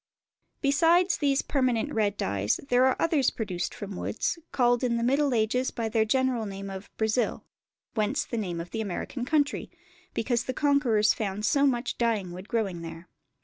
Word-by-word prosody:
Besides 335 +6 +4
these 280 -2 +1
permanent 255 0 0
red 205 -2 +1
dyes 100 - 0
there 250 +1 +5
are 260 - +2
others 310 -6 +3
produced 190 -6 -4
from 205 -2 -6
woods, 230 - -2
called 245 -1 +2
in 235 -2 +1
the 235 - -1
Middle 275 +3 +2
Ages 240 +2 +1
by 230 -2 -3
the 220 0 +2
general 250 -1 +1
name 195 0 -6
of 190 +1 -8
"Brazil"; 220 +2 0 0.5
whence 220 +6 0
the - - -5
name 180 -6 -3
of 170 +1 -7
the 225 - -2
American 220 +5 -4
country, 290 0 0 0.5
because 240 +1 0
the 255 - -3
conquerors 260 -8 +3
found 210 -1 -3
so 280 +4 +4
much 245 -1 -1
dyeing 220 -6 0
wood 185 +3 -9
growing 195 -7 -1
there. 165 +1 -9
235 Hz, 175 wpm, -27 LUFS, 205-265 Hz, 0.5 s, there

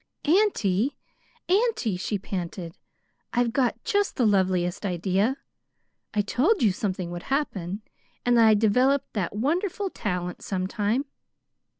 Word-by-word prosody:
"Auntie, 290 - +2 0.5
auntie," 395 - +2
she 195 +3 -2
panted; 180 -3 -5 0.6
"I've 240 -1 +1
got 255 -3 0
just 405 0 +1
the 245 - +2
loveliest 185 -3 +1
idea. 195 +6 0 0.7
I 210 - +1
told 300 - +2
you 210 - +5
something 185 -3 -3
would 175 0 -5
happen, 210 - -2 0.4
and 245 0 +4
that 230 -1 +6
I'd 215 -1 +6
develop 250 +6 +3
that 200 -2 -2
wonderful 355 - -1
talent 180 -3 -3
sometime. 205 +7 -1
215 Hz, 120 wpm, -26 LUFS, 185-270 Hz, 0.7 s, that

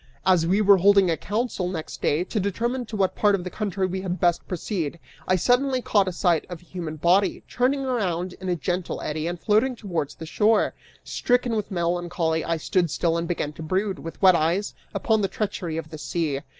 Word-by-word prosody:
As 180 -3 +4
we 195 +4 +3
were 200 -1 +7
holding 195 -1 +5
a - - +2
council, 210 -1 -2
next 165 -4 -5
day, 155 +4 +2
to 210 +4 -3
determine 235 +5 -1
to 220 - -6
what 195 -2 +1
part 205 -1 +3
of 185 - -4
the 180 - -6
country 200 -3 -2
we 185 +1 -3
had 185 -1 -3
best 175 -1 +1
proceed, 170 -3 -3 0.3
I 185 - +4
suddenly 255 +7 +2
caught 200 -6 +2
sight 175 -4 +2
of 175 -2 -6
a 175 - -21
human 170 -4 -6
body, 180 +6 +2
turning 265 +3 +1
around 185 -8 -1
in 185 - -3
a 175 - +2
gentle 180 +2 -2
eddy 155 +1 -3
and 175 0 -4
floating 220 +7 +2
towards 175 -10 -3
the 160 - -8
shore. 210 +6 +2 0.3
Stricken 245 -1 +1
with 210 -2 -2
melancholy, 170 -2 -1
I 165 0 -1
stood 175 +2 +1
still 165 +2 0
and 170 0 -1
began 160 -4 -2
to 160 - -10
brood, 190 +4 -1
with 165 -1 -8
wet 185 -1 +8
eyes, 170 +6 0 0.2
upon 220 -2 +1
the 195 - +2
treachery 185 -6 -3
of 160 -1 -6
the 155 - -7
sea. 150 -3 -1
185 Hz, 210 wpm, -24 LUFS, 170-205 Hz, 0.3 s, wet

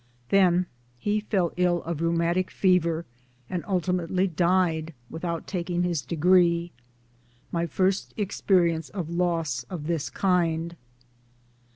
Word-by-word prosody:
Then 180 -2 +4 0.3
he 205 +11 0
fell 195 -5 0
ill 175 -1 +2
of 165 -1 -4
rheumatic 170 +2 +1
fever, 170 -3 +2 0.4
and 175 +3 -3
ultimately 180 -1 0
died 170 -3 +1 0.2
without 165 0 -4
taking 175 -1 -2
his 175 -4 0
degree 170 0 +3 0.8
my 170 0 -1
first 185 +5 0
experience 180 -5 +1
of 175 -5 -5
loss 165 -7 0
of 165 -5 -6
this 165 -3 -1
kind. 170 -3 0
175 Hz, 110 wpm, -26 LUFS, 165-185 Hz, 0.8 s, Then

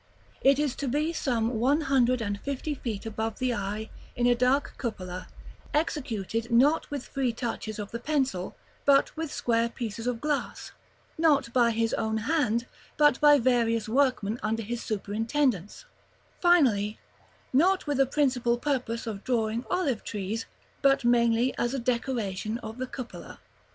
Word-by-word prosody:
It 275 0 +5
is 290 -3 0
to 280 - -3
be 300 +6 0
some 235 -6 0
one 280 +6 +3
hundred 255 -4 +2
and 205 -1 -3
fifty 280 +2 -3
feet 230 -6 -5
above 220 0 -3
the 255 -1 0
eye, 210 +1 -4 0.2
in 240 - +1
a 245 - +5
dark 255 +4 +1
cupola; 185 -7 -5 0.5
executed 235 - -1
not 270 +7 +3
with 285 -3 -4
free 265 -3 0
touches 225 -2 -4
of 205 -1 -6
the 235 - -4
pencil, 260 -10 -1 0.3
but 275 -1 +4
with 320 -2 -4
square 230 0 +1
pieces 230 -1 -5
of 245 -2 -1
glass; 295 +1 -3 0.5
not 290 -7 +3
by 240 -2 +4
his 225 0 0
own 220 0 0
hand, 235 -2 +1 0.3
but 295 -3 +4
by 295 -1 +7
various 230 -3 +2
workmen 245 -3 +1
under 225 +1 -1
his 235 +3 -4
superintendence; 220 - -1 0.5
finally, 245 - +3 0.6
not 365 +8 +3
with 290 -3 -1
a 270 - +4
principal 250 -4 +1
purpose 245 -4 -2
of 210 -3 -5
drawing 230 -2 0
olive 285 -11 0
trees, 210 +3 -4 0.3
but 275 -3 +3
mainly 235 +1 +3
as 240 +3 0
a - - -1
decoration 235 -4 -2
of 220 +3 -7
the 255 - -2
cupola. 255 -2 -8
240 Hz, 155 wpm, -28 LUFS, 225-275 Hz, 0.6 s, by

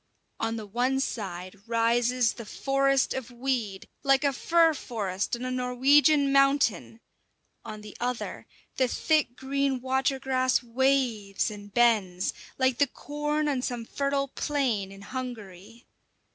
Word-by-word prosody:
On 225 0 -1
the 220 -2 -6
one 245 +6 0
side 190 -6 -4
rises 235 +1 +2
the 230 - -9
forest 275 +2 +1
of 260 -2 -5
weed, 240 -6 -3
like 275 +1 +3
a 280 -1 +2
fir 330 +3 +3
forest 210 -8 -3
on 240 +1 -6
a 255 - -2
Norwegian 275 +3 +4
mountain; 275 -5 +2 0.6
on 215 0 -8
the 210 -1 -11
other 245 0 -4 0.3
the 260 -2 +3
thick 300 -1 +1
green 275 0 -1
water 265 +2 0
grass 255 -1 +1
waves 240 -5 0
and 205 -1 -10
bends 205 -6 +2 0.2
like 260 -2 +1
the 285 - +4
corn 295 +3 -2
on 275 -3 0
some 245 -2 -3
fertile 275 +2 -1
plain 250 -11 -1
in 195 0 -12
Hungary. 230 -3 -8
250 Hz, 135 wpm, -27 LUFS, 225-275 Hz, 0.6 s, Norwegian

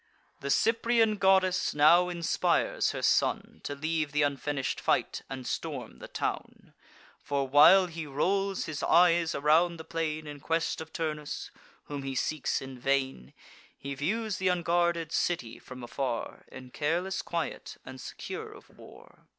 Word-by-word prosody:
The 140 - -5
Cyprian 225 +3 +3
goddess 190 -3 +3
now 170 +5 +6
inspires 170 -2 +1
her - - -4
son - - +1
To 145 - -3
leave 155 0 -2
th' 150 0 +3
unfinish'd 140 -1 -1
fight, - - 0
and 130 -1 -6
storm - - -5
the - - -9
town: - - -5 0.5
For, 140 -1 -2
while 150 +8 +7
he 165 -3 -6
rolls 195 +7 0
his 155 -2 -5
eyes 170 -1 +4
around 160 +4 +3
the 160 - -8
plain 155 -1 -3
In 145 -1 -8
quest 165 +2 -1
of 160 0 -9
Turnus, 155 -3 -4 0.3
whom 145 -1 -6
he 135 -1 -4
seeks 145 +1 -1
in 130 -1 -9
vain, 130 - -1 0.4
He 140 0 -6
views 205 +9 -2
th' 190 - 0
unguarded 170 -2 +1
city 125 -12 -1
from 130 -1 -10
afar, 120 -1 -4
In 130 -1 -11
careless 175 +7 -1
quiet, 170 -2 -4
and 130 -1 -9
secure - - -7
of - - -15
war. - - -16
155 Hz, 150 wpm, -29 LUFS, 140-175 Hz, 0.5 s, while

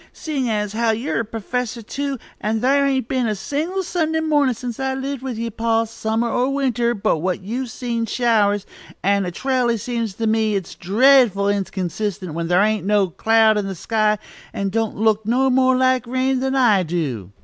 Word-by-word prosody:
"Seein' 285 -5 -3
as 210 -2 -1
you're 230 +3 0
a - - 0
perfessor, 230 +2 -4
too, 280 +4 -3 0.2
and 220 +1 -1
thar' 280 +4 +3
ain't 265 -4 0
been 255 -3 0
a 215 - -1
single 320 - -2
Sunday 320 -3 -1
mornin' 295 -5 +2
since 240 +1 -6
I've 265 0 -1
lived 270 -1 -4
with 260 -4 -5
ye, 230 0 -3
pa, 225 +1 +1
summer 225 +1 -2
or 245 +3 0
winter, 245 -4 0
but 195 -6 0
what 185 +2 -2
you've 245 +5 -4
seen 235 -2 -3
showers, 210 -4 +2 0.4
and 200 -1 +2
it 175 - -6
r'aly 250 -3 +2
seems 230 -2 -3
to 225 - -2
me 220 -1 +1
it's 190 -4 -4
dreadful 210 0 +4
inconsistent 195 -2 -3
when 165 +1 -3
thar' 180 +3 +4
ain't 215 -1 +1
no 205 -2 +3
cloud 220 +2 +3
in 200 - -3
the 195 - -4
sky, 215 +3 +1 0.4
and 195 -1 -2
don't 225 0 -1
look 220 0 +1
no 260 +3 +2
more 260 0 +3
like 255 -1 +2
rain 260 +1 0
than 265 +1 -1
I 230 -7 +4
do." 145 - -3
230 Hz, 190 wpm, -21 LUFS, 205-260 Hz, 0.4 s, dreadful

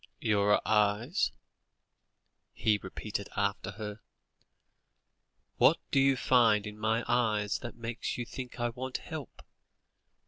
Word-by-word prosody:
"Your 105 -1 +3
eyes 105 - +2 0.6
" - - -51 0.5
he 105 -2 +2
repeated 100 +1 -5
after 100 -2 0
her. 105 +1 -6 1.6
"What - - +6
do - - +4
you 135 0 +5
find 115 -5 +4
in 105 0 -8
my 110 +2 +1
eyes 110 -4 +1
that 120 - -7
makes 115 0 -4
you 120 - -3
think 125 +1 -8
I 120 0 +1
want 130 +2 -4
help?" - - -8
110 Hz, 125 wpm, -31 LUFS, 105-120 Hz, 1.6 s, What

